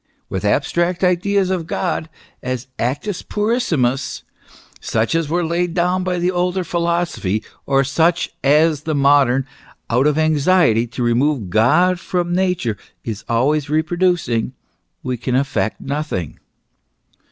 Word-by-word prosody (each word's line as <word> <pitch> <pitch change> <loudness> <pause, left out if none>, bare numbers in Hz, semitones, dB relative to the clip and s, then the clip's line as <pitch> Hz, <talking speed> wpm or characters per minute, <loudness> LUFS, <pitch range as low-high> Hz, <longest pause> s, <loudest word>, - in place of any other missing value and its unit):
" - - -45
With 95 - -3
abstract 170 - 0
ideas 185 +2 +2
of 175 -4 -2
God 165 -3 -2 0.3
as 130 -1 -3
actus 145 - -2
puris 230 +4 -1
simus, 130 -3 0 0.6
such 110 +4 -1
as 165 -2 0
were 175 +1 0
laid 170 +1 -1
down 180 +1 +1
by 180 -1 -1
the 175 +1 +1
older 180 +1 0
philosophy, 170 - -1 0.2
or 135 0 +3
such 165 +5 +1
as 150 +2 +3
the 155 0 -2
modern, 140 -2 +3 0.5
out 125 +5 +3
of 150 0 +1
anxiety 155 -6 +3
to 125 +1 -4
remove 120 -3 +1
God 165 - +3
far 180 0 -1
from 175 0 -4
Nature, 180 - 0 0.3
is 110 -3 -5
always 140 +5 +1
reproducing, 160 -6 0 0.5
we 125 -1 -2
can 125 +2 -2
effect 135 -4 0
nothing. 140 - -4
155 Hz, 140 wpm, -19 LUFS, 130-175 Hz, 0.6 s, or